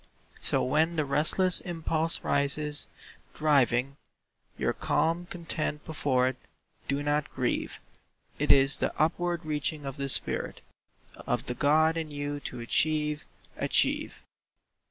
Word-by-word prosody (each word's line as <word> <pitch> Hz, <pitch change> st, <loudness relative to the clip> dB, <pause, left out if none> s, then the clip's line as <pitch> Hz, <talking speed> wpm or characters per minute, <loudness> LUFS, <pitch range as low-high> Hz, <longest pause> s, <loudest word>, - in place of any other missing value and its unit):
So -, -, +2 dB
when 155 Hz, +5 st, +1 dB
the 155 Hz, -2 st, 0 dB
restless 160 Hz, +6 st, +3 dB
impulse 165 Hz, -2 st, 0 dB
rises, 145 Hz, +1 st, 0 dB, 0.5 s
driving 140 Hz, -3 st, +2 dB, 0.6 s
Your -, -, 0 dB
calm 170 Hz, +2 st, 0 dB
content 165 Hz, -3 st, -4 dB
before 135 Hz, -5 st, +1 dB
it, 130 Hz, -, -7 dB, 0.5 s
do 140 Hz, +1 st, -1 dB
not 145 Hz, 0 st, 0 dB
grieve; 130 Hz, -2 st, -2 dB, 0.6 s
It -, -, +3 dB
is 135 Hz, 0 st, +5 dB
the -, -, -3 dB
upward 170 Hz, +1 st, 0 dB
reaching 150 Hz, -1 st, -2 dB
of 135 Hz, -1 st, -6 dB
the 140 Hz, 0 st, -2 dB
spirit -, -, +1 dB, 0.7 s
Of -, -, -1 dB
the 125 Hz, -, -2 dB
God 155 Hz, +4 st, +3 dB
in 160 Hz, -1 st, -3 dB
you 145 Hz, 0 st, -4 dB
to 125 Hz, -3 st, -7 dB
achieve—achieve. 150 Hz, +4 st, 0 dB
150 Hz, 120 wpm, -28 LUFS, 140-160 Hz, 0.7 s, is